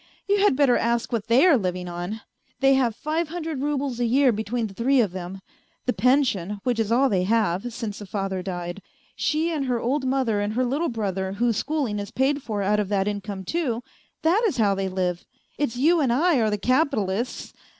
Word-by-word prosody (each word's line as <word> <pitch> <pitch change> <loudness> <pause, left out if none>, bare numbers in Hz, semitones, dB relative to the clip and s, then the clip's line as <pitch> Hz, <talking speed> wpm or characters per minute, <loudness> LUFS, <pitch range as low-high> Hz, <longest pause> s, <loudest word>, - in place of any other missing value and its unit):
You 405 0 +2
had 405 -8 +4
better 265 -3 +4
ask 235 +1 0
what 225 -2 -2
they 240 +8 +5
are 315 -9 +5
living 180 -2 -3
on! 175 +5 -5 0.4
They 270 0 +5
have 250 -5 +2
five 315 +4 -2
hundred 320 -3 -4
roubles 280 -4 -2
a 240 - +1
year 260 +3 +4
between 220 +2 -2
the 205 - -7
three 255 +6 +2
of 210 -6 +2
them: 185 +1 -7 0.4
the 250 - +1
pension, 210 -5 +1
which 245 -3 0
is 225 -1 0
all 260 +4 +4
they 195 -7 +1
have, 210 +1 0
since 225 -3 -5
the 205 - -9
father 195 -1 -3
died. 175 0 -5 0.3
She 320 +2 0
and 295 -4 -1
her 250 -2 0
old 260 +3 -1
mother 255 -6 +1
and 205 +1 -2
her 255 +3 +1
little 290 +7 0
brother, 195 -5 -2
whose 230 +1 +1
schooling 275 -9 -1
is 200 - -5
paid 275 +3 0
for 210 -5 -3
out 210 +2 +2
of 205 -2 -1
that 200 -1 +1
income 205 -1 -4
too 250 - -2 0.4
that 345 +7 +3
is 360 - -2
how 205 -3 +3
they 195 0 -2
live! 180 -2 -2 0.4
It's 265 -5 -1
you 320 +5 +4
and 265 -4 +2
I 315 +5 +3
are 220 - +2
the 210 - 0
capitalists 240 - 0
230 Hz, 210 wpm, -24 LUFS, 200-275 Hz, 0.4 s, they